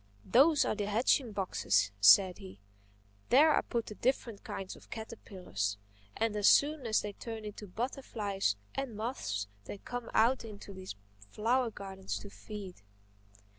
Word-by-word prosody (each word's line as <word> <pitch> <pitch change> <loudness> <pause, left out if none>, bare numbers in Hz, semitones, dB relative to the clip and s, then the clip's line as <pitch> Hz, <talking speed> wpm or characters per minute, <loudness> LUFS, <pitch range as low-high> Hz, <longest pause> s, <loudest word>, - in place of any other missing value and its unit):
"Those 290 +4 +5
are - - +1
the 205 -1 -3
hatching 230 +3 +2
boxes," 105 - +1
said 180 - +7
he. 95 +1 -11 0.7
"There 300 +4 +6
I - - +3
put 235 -2 -2
the - - -7
different 235 -2 -1
kinds 190 -1 -6
of - - -17
caterpillars. 185 - -4 0.4
And 225 -1 0
as 205 -1 +5
soon 290 -3 +3
as 215 - +2
they 210 -1 -5
turn 225 0 -7
into 210 0 -7
butterflies 210 - -2 0.2
and 270 -5 -4
moths 105 - -3 0.2
they - - -7
come 245 +3 -6
out 240 +4 +4
into 205 -2 -9
these 185 - -8 0.3
flower 235 - +1
gardens 190 -2 -6
to 200 - -10
feed." 200 - -9
210 Hz, 150 wpm, -32 LUFS, 190-240 Hz, 0.7 s, said